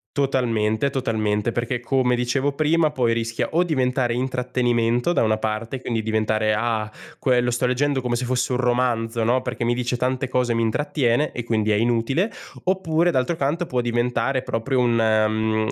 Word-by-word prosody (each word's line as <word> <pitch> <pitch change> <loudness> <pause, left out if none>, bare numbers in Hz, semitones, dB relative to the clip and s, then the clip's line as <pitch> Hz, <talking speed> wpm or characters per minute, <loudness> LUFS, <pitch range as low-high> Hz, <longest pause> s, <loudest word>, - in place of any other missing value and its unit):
Totalmente, 125 -3 +1
totalmente, 110 -5 -1
perché 120 +1 -2
come 125 0 +1
dicevo 125 +3 0
prima 155 +2 +2
poi 125 -5 +1
rischia 115 0 -2
o 170 +3 +3
diventare 130 -6 0
intrattenimento 125 +1 0
da - - +2
una 110 -1 +2
parte, 110 +4 -3
quindi 115 -2 -2
diventare: 110 0 0
“Ah, 110 -1 -1 0.3
quello, 125 -2 +2
sto 120 +1 0
leggendo 135 +2 0
come 120 -1 -1
se 125 +1 -2
fosse 125 +1 -1
un - - +1
romanzo, 120 -2 0
no, 125 +3 +1
perché 125 -1 -3
mi 120 +1 +1
dice 125 0 -1
tante 130 +1 -1
cose, 125 -2 0
mi 115 - +1
intrattiene 130 +2 0
e 120 - -4
quindi 110 -2 0
è 105 - +3
inutile.” 120 - +1 0.3
Oppure 175 -2 +1
d'altro 130 +5 0
canto 160 +5 -1
può 125 - -1
diventare 120 +2 0
proprio 125 +4 -1
un 120 -1 +2
mhmm, 110 -1 +1
120 Hz, 170 wpm, -22 LUFS, 115-130 Hz, 0.3 s, o